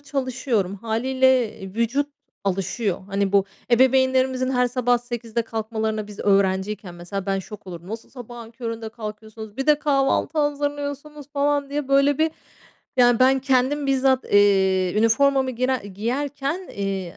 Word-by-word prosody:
çalışıyorum 255 -8 -1
hâliyle, 250 +2 +1
eee, 190 0 -9
vücut 235 +6 +1 0.4
alışıyor. 195 +1 -1
Hani, 200 0 -1
bu 200 -1 +4 0.3
ebeveynlerimizin 260 +1 +3
her 250 -1 +2
sabah 245 0 +1
08.00'de 235 -1 -4
kalkmalarına. 220 -1 -3
Biz 205 -1 -12
öğrenciyken 195 -1 +1
mesela, 180 +3 -6
ben 195 0 0
şok 195 +1 -10
olurdum. 175 0 -9
O 220 - -2
sa 230 - -22
sabahın 240 -2 -10
köründe 230 -1 -5
kalkıyorsunuz, 220 -1 -9
bir 270 - -3
de 300 -1 +5
kahvaltı 280 +1 +1
hazırlıyorsunuz, 290 0 -2
falan 285 -1 0
diye, 290 -1 -3
böyle 275 +1 +3
bir, 320 +1 +2 0.7
yani, 245 -2 +5
ben 265 +1 +5
kendim 270 +2 +1
bizzat, 265 -1 +2
eee, 190 -2 +3
üniformamı 265 +4 +3
girer 255 +1 0
giyerken, 275 - -3
eee, 195 -3 -4
240 Hz, 140 wpm, -23 LUFS, 205-270 Hz, 0.7 s, de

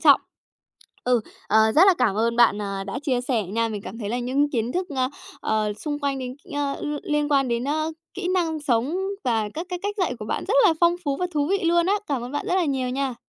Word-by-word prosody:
trọng. - - +7 0.8
Ừ, 245 -1 +3 0.3
ờ, 215 - +5 0.2
rất 320 - +7
là 385 - +7
cảm 220 -6 +2
ơn 230 +2 +1
bạn, 235 -3 +5
ờ, 195 -1 -3
đã 200 - -3
chia 255 -4 +1
sẻ 245 -3 0
nha, 225 +5 -1
mình 210 -2 -5
cảm 215 +3 -8
thấy 210 -4 -4
là 240 +3 -1
những 270 +4 +1
kiến 235 -2 -1
thức, 365 +1 -1
ơ, 255 -1 +2 0.3
ờ, 215 -1 0
xung 290 +7 -4
quanh 280 -1 -1
đến 255 -1 -5
cái, 370 - -13
ơ, 275 -1 -1
ưm, 295 0 -3
liên 295 0 0
quan 275 -2 +3
đến, 235 0 -1
ơ, 310 +3 -1 0.2
kỹ 370 -2 -3
năng 325 -4 0
sống 260 +1 +1 0.3
và 225 -4 +1
các 330 +3 -4
cái 360 - -2
cách 410 +1 -2
dạy 360 -9 +1
của - - -6
bạn - - -2
rất 435 - +2
là 335 - +4
phong 345 0 +4
phú 280 -2 0
và 360 - -1
thú 290 -1 +1
vị 395 0 +2
luôn 340 +1 +3
á. 395 - +3
Cảm 275 -5 -1
ơn 245 +2 -6
bạn 290 - -3
rất - - +1
là 370 - +3
nhiều 265 -4 -1
nha. 265 0 -1
270 Hz, 260 wpm, -24 LUFS, 235-315 Hz, 0.8 s, trọng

